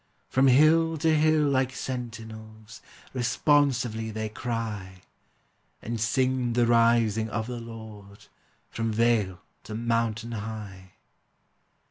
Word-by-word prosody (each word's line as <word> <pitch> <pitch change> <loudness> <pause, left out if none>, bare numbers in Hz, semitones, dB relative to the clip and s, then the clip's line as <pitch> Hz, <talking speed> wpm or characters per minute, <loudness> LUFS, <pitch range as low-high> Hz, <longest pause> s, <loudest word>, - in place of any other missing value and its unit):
From 135 +1 +3
hill 160 +5 +5
to 160 +1 +2
hill 155 0 +3
like 130 -2 +1
sentinels, 110 -3 -7 0.3
Responsively 125 -3 +1
they 110 0 -4
cry, 105 -5 -5 0.8
And 115 -1 -5
sing 130 +1 +1
the 120 0 +3
rising 115 -2 +3
of 110 0 -2
the 120 0 -5
Lord, 110 -3 -11 0.5
From 115 -1 -2
vale 110 -5 +1 0.2
to 110 - -8
mountain 115 0 -1
high. 100 -4 -7
115 Hz, 105 wpm, -27 LUFS, 110-125 Hz, 0.8 s, hill